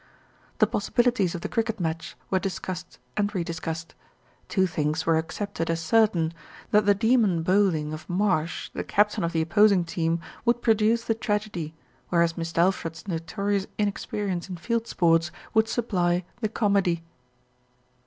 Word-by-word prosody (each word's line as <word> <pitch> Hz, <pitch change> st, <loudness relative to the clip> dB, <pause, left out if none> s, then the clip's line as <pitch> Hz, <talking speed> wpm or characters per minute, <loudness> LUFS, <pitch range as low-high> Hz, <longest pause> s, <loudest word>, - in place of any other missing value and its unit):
The -, -, +5 dB
possibilities 240 Hz, -8 st, +1 dB
of 170 Hz, -, -5 dB
the -, -, -3 dB
cricket 225 Hz, -1 st, -1 dB
match 165 Hz, -1 st, -3 dB, 0.2 s
were 190 Hz, -, +3 dB
discussed 185 Hz, -1 st, -5 dB, 0.2 s
and 205 Hz, -1 st, +1 dB
re 180 Hz, -, 0 dB
discussed. 165 Hz, 0 st, -5 dB, 0.6 s
Two 190 Hz, -2 st, +3 dB
things 160 Hz, -2 st, -1 dB
were 165 Hz, -, +4 dB
accepted 165 Hz, +1 st, -3 dB
as 165 Hz, 0 st, 0 dB
certain, 170 Hz, -2 st, +2 dB, 0.4 s
that 210 Hz, -1 st, +4 dB
the 205 Hz, -, +6 dB
demon 220 Hz, -6 st, +3 dB
bowling 175 Hz, -5 st, +2 dB
of 155 Hz, -, -8 dB
Marsh, 180 Hz, -3 st, 0 dB
the -, -, -3 dB
captajn 210 Hz, 0 st, +2 dB
of 170 Hz, -, 0 dB
the 160 Hz, -1 st, +1 dB
opposing 200 Hz, +1 st, +4 dB
team, 165 Hz, 0 st, 0 dB, 0.2 s
would 240 Hz, 0 st, +1 dB
produce 225 Hz, +1 st, +3 dB
the 225 Hz, -, +1 dB
tragedy, 210 Hz, -8 st, -3 dB, 0.3 s
whereas 170 Hz, -1 st, +2 dB
Mist' 165 Hz, -1 st, -5 dB
Alfred's 170 Hz, -1 st, 0 dB
notorious 200 Hz, +3 st, -1 dB
inexperience 200 Hz, -3 st, -2 dB
in 180 Hz, -, -5 dB
field 230 Hz, +6 st, -1 dB
sports 165 Hz, -1 st, +3 dB, 0.2 s
would 220 Hz, 0 st, +4 dB
supply 180 Hz, -7 st, 0 dB
the 215 Hz, -3 st, -1 dB
comedy. 200 Hz, -6 st, +1 dB
185 Hz, 150 wpm, -26 LUFS, 165-210 Hz, 0.6 s, the